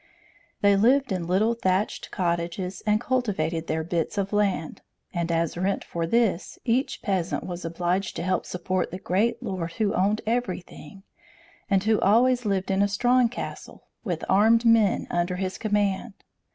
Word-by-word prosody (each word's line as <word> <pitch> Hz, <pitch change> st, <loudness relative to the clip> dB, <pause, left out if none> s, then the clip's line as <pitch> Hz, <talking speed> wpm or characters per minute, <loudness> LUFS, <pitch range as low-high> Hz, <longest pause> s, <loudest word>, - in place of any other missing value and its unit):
They 200 Hz, 0 st, +5 dB
lived 255 Hz, +5 st, +3 dB
in 180 Hz, -3 st, -2 dB
little 205 Hz, +6 st, +2 dB
thatched 190 Hz, -2 st, -1 dB
cottages, 175 Hz, +1 st, -2 dB
and 210 Hz, 0 st, +3 dB
cultivated 190 Hz, -11 st, -1 dB
their 160 Hz, 0 st, -1 dB
bits 170 Hz, +2 st, -2 dB
of 200 Hz, +1 st, -1 dB
land; 195 Hz, -6 st, 0 dB, 0.3 s
and 170 Hz, -1 st, -1 dB
as 165 Hz, -1 st, 0 dB
rent 190 Hz, +3 st, -1 dB
for 170 Hz, -1 st, -3 dB
this, 220 Hz, -3 st, +1 dB
each 255 Hz, +3 st, 0 dB
peasant 185 Hz, -4 st, -1 dB
was 180 Hz, -1 st, -6 dB
obliged 175 Hz, +3 st, -1 dB
to -, -, -3 dB
help 185 Hz, 0 st, -1 dB
support 180 Hz, +1 st, -2 dB
the 180 Hz, -, -6 dB
great 200 Hz, +7 st, 0 dB
lord 185 Hz, -6 st, -4 dB
who 215 Hz, 0 st, 0 dB
owned 205 Hz, +3 st, +1 dB
everything, 195 Hz, -6 st, -4 dB, 0.7 s
and 195 Hz, -2 st, +2 dB
who 220 Hz, 0 st, +2 dB
always 245 Hz, +4 st, +3 dB
lived 195 Hz, -2 st, 0 dB
in 195 Hz, +1 st, +2 dB
a 200 Hz, -, +4 dB
strong 245 Hz, +4 st, +3 dB
castle, 245 Hz, -, -7 dB, 0.2 s
with 175 Hz, -7 st, -3 dB
armed 225 Hz, +4 st, +4 dB
men 225 Hz, -3 st, +4 dB
under 175 Hz, +1 st, 0 dB
his 185 Hz, 0 st, -3 dB
command. 205 Hz, 0 st, 0 dB
195 Hz, 160 wpm, -25 LUFS, 175-220 Hz, 0.7 s, They